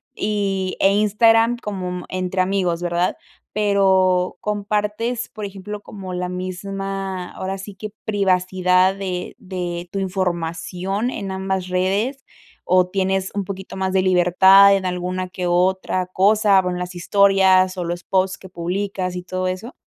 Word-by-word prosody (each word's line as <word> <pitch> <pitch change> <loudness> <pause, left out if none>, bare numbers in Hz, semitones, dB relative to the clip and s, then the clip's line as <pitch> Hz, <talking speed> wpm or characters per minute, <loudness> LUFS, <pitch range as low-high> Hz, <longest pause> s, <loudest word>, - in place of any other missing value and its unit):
y 195 -3 -1
e 195 - +5
Instagram 225 +3 +4
como 185 -5 -5
entre 185 0 -1
amigos, 185 -3 0
¿verdad?, 175 +1 0 0.4
pero 190 -3 +2
compartes, 210 +3 -2
por 215 -1 -7
ejemplo, 200 +1 -7
como 190 -3 -8
la 180 0 -2
misma 190 0 -4
ahora 190 +1 -4
sí 195 +1 -9
que 210 +1 -7
privacidad 185 -2 +2
de 185 -2 -4
de 180 -4 -5
tu 195 - -3
información 185 +3 -2
en 195 -2 -5
ambas 190 -1 -2
redes, 200 +9 -1 0.4
¿o 180 0 +3
tienes 190 0 -1
un 200 - -1
poquito 190 -1 -7
más 190 0 -1
de 190 - +3
libertad 190 +2 +6
en 190 -1 -2
alguna 180 +1 -3
que 180 0 -5
otra 185 +1 +1
cosa, 200 +1 +4
bueno, 180 -1 -3
las 180 0 -5
historias 190 0 +4
o 180 - -2
los 175 0 -4
posts 190 0 0
que 190 - -12
publicas 185 +1 -3
y 180 - -4
todo 185 0 -3
eso? 185 - -5
190 Hz, 145 wpm, -21 LUFS, 180-200 Hz, 0.4 s, libertad